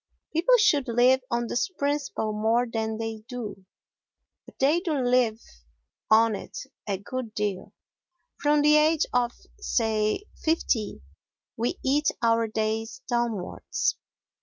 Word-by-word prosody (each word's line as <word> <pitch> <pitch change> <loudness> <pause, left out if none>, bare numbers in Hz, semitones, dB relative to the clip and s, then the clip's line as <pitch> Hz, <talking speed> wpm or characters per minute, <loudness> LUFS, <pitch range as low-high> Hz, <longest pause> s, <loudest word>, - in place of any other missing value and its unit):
People 350 +11 +4
should 295 - +3
live 245 +3 +4
on 240 -1 0
this 240 +9 -1
principle 285 - -2
more 225 +3 +2
than 220 -2 -3
they 225 0 -4
do, 215 -6 -7 0.8
but - - -16
they 290 +5 +3
do 345 -4 -2
live 245 -4 +2 0.7
on 225 0 +5
it - - -8 0.3
a 200 -2 -1
good 225 +3 -6
deal; 205 -3 -2 0.7
from 295 0 +3
the 300 +1 +6
age 310 +1 +3
of, 245 -1 +2 0.3
say, 220 - 0 0.2
fifty 240 - 0 0.5
we 235 +2 -1
eat 290 +3 +2 0.2
our 230 0 +3
days 220 +3 -2
downwards. 235 -6 -1
240 Hz, 125 wpm, -26 LUFS, 220-285 Hz, 0.8 s, the